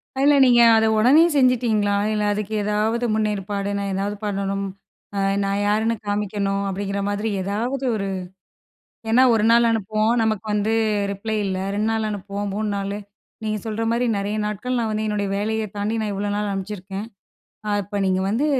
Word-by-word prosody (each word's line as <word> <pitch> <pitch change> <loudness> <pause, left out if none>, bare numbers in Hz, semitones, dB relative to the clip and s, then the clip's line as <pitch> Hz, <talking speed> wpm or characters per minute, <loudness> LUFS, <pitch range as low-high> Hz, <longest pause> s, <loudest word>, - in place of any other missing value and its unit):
அதுல 280 +2 +4
நீங்க 240 -1 +6
அத 220 0 +4
உடனே 275 +9 +6
செஞ்சுட்டீங்களா? 230 -6 +3 0.2
இல்ல, 210 -1 0
அதுக்கு 210 +1 -4
எதாவது 215 +3 0
முன்னேற்பாடு 205 -2 -1
நான் 200 -1 -2
எதாவது 200 +2 -2
பண்ணணும், 195 -1 -2 0.5
அ - - +1 0.2
நான் 195 0 0
யாருன்னு 220 +2 +1
காமிக்கணும், 200 -1 -1
அப்டிங்கிற 200 +1 -3
மாதிரி 205 +2 -1
ஏதாவது 240 +7 -2
ஒரு 200 -2 -2 1.0
ஏன்னா 245 +3 +5
1 220 - +2
நாள் 235 0 +5
அனுப்புவோம். 215 +1 +1
நமக்கு 220 -1 0
வந்து 210 +1 +1 0.4
ரிப்ளை 215 +2 -3
இல்ல. 190 -2 -2 0.2
2 210 +2 0
நாள் 220 -1 0
அனுப்புவோம், 205 0 -4
3 215 +1 -2
நாளு. 200 +1 -3 0.5
நீங்க 215 0 -1
சொல்ற 220 0 -3
மாரி 240 +1 +1
நெறைய 200 +2 -2
நாட்கள் 210 +5 -2
நான் 225 -2 -1
வந்து 215 0 -1
என்னுடைய 205 -1 -1
வேலைய 220 +2 -1
தாண்டி 210 +2 -1
நான் 210 -1 -2
இவ்வளோ 205 +1 -2
நாள் 210 0 -1
அனுப்பிச்சிருக்கேன். 195 +1 -5 0.6
ஆ - - -1
இப்ப 205 +1 -4
நீங்க 185 0 +1
வந்து 235 +8 +1
210 Hz, 165 wpm, -22 LUFS, 200-220 Hz, 1.0 s, நீங்க